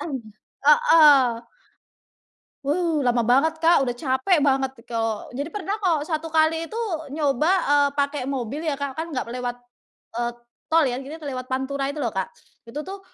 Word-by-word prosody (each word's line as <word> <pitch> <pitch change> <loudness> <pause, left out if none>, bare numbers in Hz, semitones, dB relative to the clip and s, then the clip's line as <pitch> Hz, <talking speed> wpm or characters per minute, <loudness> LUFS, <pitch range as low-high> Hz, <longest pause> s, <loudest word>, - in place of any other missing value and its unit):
heeh. 280 +2 +4 1.4
Wow, 320 +1 0
lama 245 -1 +2
banget 280 +7 +3
Kak, 335 0 +5
udah 245 - -1
capek 260 +6 +1
banget 270 -1 +1 0.2
kalau 225 -2 -2
jadi 285 +4 -3
pernah 410 -1 -3
kok 325 -6 +1
1 320 0 -2
kali 320 +1 +2
itu 450 - -6 0.4
nyoba, 295 +1 +1 0.2
eee, 285 -1 +5
pakai 285 -1 0
mobil 270 +1 -3
ya 310 -3 0
Kak, 280 -1 -2
kan 325 +1 -3
enggak 255 -4 -3
lewat, 245 -1 -3 0.6
eee, 240 0 -1 0.4
tol 325 0 +4
ya, 245 - -2
akhirnya 285 +4 -8
lewat 255 -3 -5
Pantura 270 +1 -2
itu 295 - -7
loh, 235 -5 -1
Kak. 190 -1 -1 0.4
Itu 285 +6 -5
tuh, 390 +1 -7
280 Hz, 160 wpm, -23 LUFS, 255-320 Hz, 1.4 s, Kak